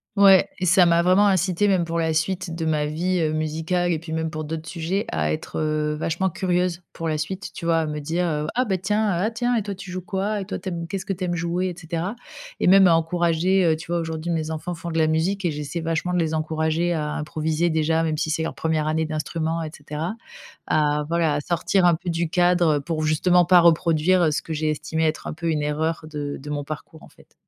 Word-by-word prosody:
Ouais. 195 -2 +6
Et 185 - -2
ça 180 0 +5
m'a 170 0 +4
vraiment 185 +4 +5
incitée, 190 +1 +2
même 185 -4 +2
pour 165 0 -2
la 160 -1 +1
suite 165 +1 -1
de 165 - -3
ma 150 -2 +1
vie, 175 +4 -1
heu, 155 -1 0
musicale 160 +3 -1
et 160 - 0
puis, 160 -1 -7
même 160 0 -2
pour 155 -1 -5
d'autres 160 +1 -5
sujets, 175 +4 -2
à 75 -1 0
être, 80 - -4
heu, 155 -1 0
vachement 165 +4 -1
curieuse, 180 -1 0
pour 165 - -5
la 155 -1 -1
suite, 190 +4 -4
tu - - -7
vois, 165 -1 +3
à - - -1
me 150 0 -4
dire: 155 0 -1
«Ah 255 - +2
ben, 190 -5 -1
tiens 210 +2 +1
ah 185 +5 0
tiens 240 +1 0
et 225 - +1
toi 200 -1 -5
tu 185 0 -9
joues 185 0 -4
quoi? 200 +2 -2
Et 190 - -5
toi, 205 - -4
tu 190 - -5
aimes 170 -1 -4
qu'est-ce 190 +1 -4
que 195 - -1
tu 185 0 -6
aimes 175 -1 -1
jouer, 175 +2 -1
et 180 - -4
cetera.» 170 +4 -4 0.4
Et - - 0
même 190 0 +7
à 165 - +5
encourager, 170 +3 +2
heu. 165 -2 +3
Tu 165 +2 -9
vois, 175 - +1
aujourd'hui, 160 +1 -3
mes 160 -1 -1
enfants 160 +3 -4
font 170 +1 -7
de 165 - -3
la 160 - +4
musique 175 +5 0
et 170 - +2
j'essaie 150 +3 -4
vachement 165 +2 -1
de 180 - +2
les 160 -1 0
encourager 160 +2 0
à 150 -2 -2
improviser 155 +2 -1
déjà, 160 0 +1
même 160 -1 -1
si 155 0 -1
c'est 160 - -1
leur 160 - -3
1re 155 -1 -1
année 160 +1 0
d'instrument, 160 +1 -2
et 155 - -4
cetera, 150 +5 -5 0.5
à, 150 -1 +1
voilà, 165 -3 +1
à 145 - -1
sortir 175 +3 +1
un 175 - +6
peu 175 +1 -6
du 170 0 0
cadre 175 -3 +3
pour 155 +2 -3
justement 175 +3 +3
pas 180 0 +6
reproduire 165 0 +3
ce - - -1
que 160 - -6
j'ai 155 0 0
estimé 160 +2 -2
être 155 0 -2
un - - -4
peu 165 +1 -3
une 150 -2 0
erreur 155 +2 -1
de 145 -1 -4
de 145 +2 -10
mon 145 -1 -2
parcours, 155 +2 -8
en - - -14
fait. - - -23
165 Hz, 250 wpm, -23 LUFS, 155-180 Hz, 0.5 s, même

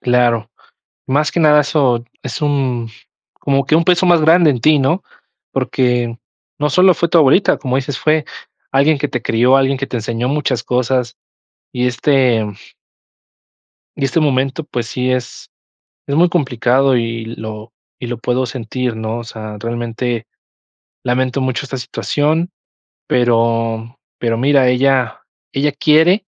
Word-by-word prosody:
Claro. 120 -3 +1 0.6
Más 145 +3 +1
que 175 - 0
nada, 150 -2 +6
eso 135 -5 +1 0.2
es 130 -4 -5
un 130 -5 -1 0.5
como 140 -1 0
que 155 - +3
un 165 - +2
peso 180 0 +3
más 175 -2 +5
grande 160 +1 +5
en 125 -4 -2
ti, 155 +2 +4
¿no? 140 +8 +1 0.5
Porque 120 -2 0 0.4
no 150 0 0
solo 185 +3 +5
fue 170 - 0
tu 170 - +4
abuelita, 155 +6 +4
como 130 -2 -2
dices: 135 0 -3
"Fue 155 -1 +1 0.5
alguien 140 +2 +3
que 145 - -2
te 125 - -3
crió, 125 +4 +3
alguien 135 0 +2
que 135 - -3
te 125 - -4
enseñó 115 +2 -2
muchas 135 -4 -1
cosas", 125 -1 -1 0.6
y 125 0 0
este 125 -3 +2 1.5
y - - -2
este 135 +5 +1
momento, 135 +1 0
pues 120 -5 -4
sí, 125 +2 -2
es 125 -2 -4 0.6
es 140 - -1
muy 175 +3 +4
complicado 135 -4 +1
y 115 -1 -3
lo 110 -1 -8 0.3
y 125 - -6
lo 120 - -4
puedo 125 +2 0
sentir, 125 0 -4
¿no? 110 +1 -4
O - - -7
sea, 110 -2 -8
realmente 120 0 -3 0.8
lamento 130 +1 0
mucho 130 +1 -2
esta 135 0 -5
situación, 155 +6 -1 0.6
pero 115 0 0 0.2
pero 115 -1 -1
mira, 135 0 +3
ella 130 -1 +1 0.3
ella 145 +2 +1
quiere 160 +7 +3
130 Hz, 150 wpm, -17 LUFS, 120-145 Hz, 1.5 s, nada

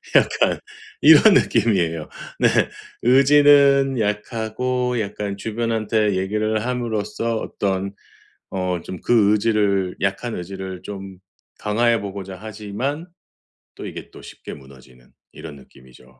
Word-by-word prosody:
약간 - - +3 0.4
이런 - - +8
느낌이에요. 85 -8 +1 0.3
네. - - +5 0.6
의지는 140 0 +5
약하고 115 +4 -2
약간 100 -1 -4
주변한테 110 -1 -1
얘기를 110 +3 -1
함으로써 115 -2 -2
어떤 100 -2 -3 0.6
어 90 -2 -2
좀 90 - -7
그 110 -4 +3
의지를 100 -3 +1
약한 100 +5 -2
의지를 95 0 -7
좀 95 -2 -8 0.4
강화해 115 +2 +1
보고자 95 -1 -7
하지만 110 - -5 0.7
또 - - -8
이게 - - -8
또 - - -13
쉽게 - - -10
무너지는 65 -2 -16 0.2
이런 80 -3 -10
느낌이죠. 65 -1 -19
105 Hz, 250 characters per minute, -21 LUFS, 95-115 Hz, 0.7 s, 이런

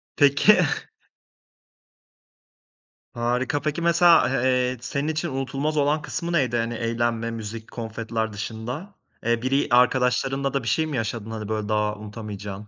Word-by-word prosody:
Peki. 145 +9 +5 2.6
Harika, 125 +4 0
peki, 155 +2 -1
mesela, 170 0 +6
a 120 - +1
eee, 125 0 +2
senin 140 +4 -2
için 160 +2 -1
unutulmaz 135 +3 -2
olan 150 +1 +2
kısmı 170 +3 -4
neydi, 130 -7 +2
hani, 115 0 -1
eğlenme, 115 0 -1
müzik, 110 0 -7
konfetiler 110 -1 -3
dışında, 120 - -6 0.3
eee, 115 0 +1
biri 135 +3 +1
arkadaşlarınla 125 +2 +2
da 140 - -1
bir - - -6
şey 160 +8 +2
mi 145 -5 -3
yaşadın? 115 -1 -3
Hani, 110 -2 -5
böyle 110 -1 -2
daha 105 0 +1
unutamayacağın? 105 -1 -7
125 Hz, 135 wpm, -24 LUFS, 110-140 Hz, 2.6 s, mesela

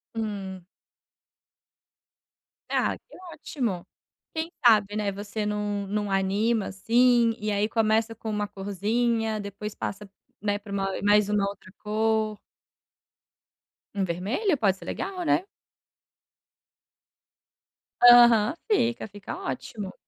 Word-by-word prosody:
Hum. 195 -4 -4 2.1
Ah, - - 0
que - - -17 0.2
ótimo. 235 - -3 0.5
Quem 320 +1 -3 0.2
sabe, 210 -3 +5
né, 205 -2 0
você 205 +2 -4
num 210 -1 -2
num 205 0 -2
anima 200 +3 +1
assim. 235 +3 +3
E 210 0 -2
aí, 205 +1 +1
começa 225 0 +1
com 225 0 -6
uma 210 -1 -1
corzinha. 215 +3 -1
Depois 205 +1 -6
passa, 200 0 -5 0.3
né, 205 0 0
pra 205 -1 -12
uma 195 -1 -1
mais 205 0 +4
uma 205 -1 +1
outra 195 -2 -12
cor. 215 0 0 1.6
Um 200 - 0
vermelho? 220 - -1
Pode 195 -5 +2
ser - - -12
legal, 375 -2 -4
né? 345 - +2 2.6
Aham. 240 0 +8 0.2
Fica, 235 - +1
fica 205 -1 -8
ótimo. 205 -6 -5
210 Hz, 110 wpm, -26 LUFS, 200-225 Hz, 2.6 s, Aham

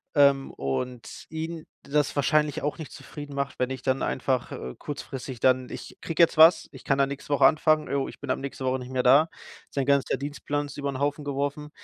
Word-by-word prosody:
ähm, 140 -2 +4
und 115 - -4
ihn 160 +1 -5 0.2
das 145 +1 0
wahrscheinlich 150 0 +2
auch 145 - -1
nicht 160 - -7
zufrieden 145 -1 -9
macht, 140 -1 -3
wenn 125 - +1
ich 130 -1 -5
dann 130 0 +1
einfach, 130 -1 -1
äh, 65 - -6
kurzfristig 135 -3 -6
dann 130 0 +3
Ich - - -9
kriege 165 0 0
jetzt 165 - +3
was, 160 +2 +7
ich - - -12
kann 135 - +1
da 140 - +4
nächste 140 +1 -7
Woche 145 - +5
anfangen. 155 0 +4
Oh, 140 -1 0
ich - - -13
bin - - -8
ab - - 0
nächste 135 -1 -5
Woche 130 0 +1
nicht 125 0 -8
mehr 130 -1 0
da. 140 +6 +6 0.4
Sein 135 -2 -1
ganzer 140 0 +2
Dienstplan 145 +1 -3
ist 140 - -10
über 140 -1 -2
'n 135 -1 -4
Haufen 145 +1 -1
geworfen. 145 +1 -2
140 Hz, 220 wpm, -26 LUFS, 130-150 Hz, 0.4 s, was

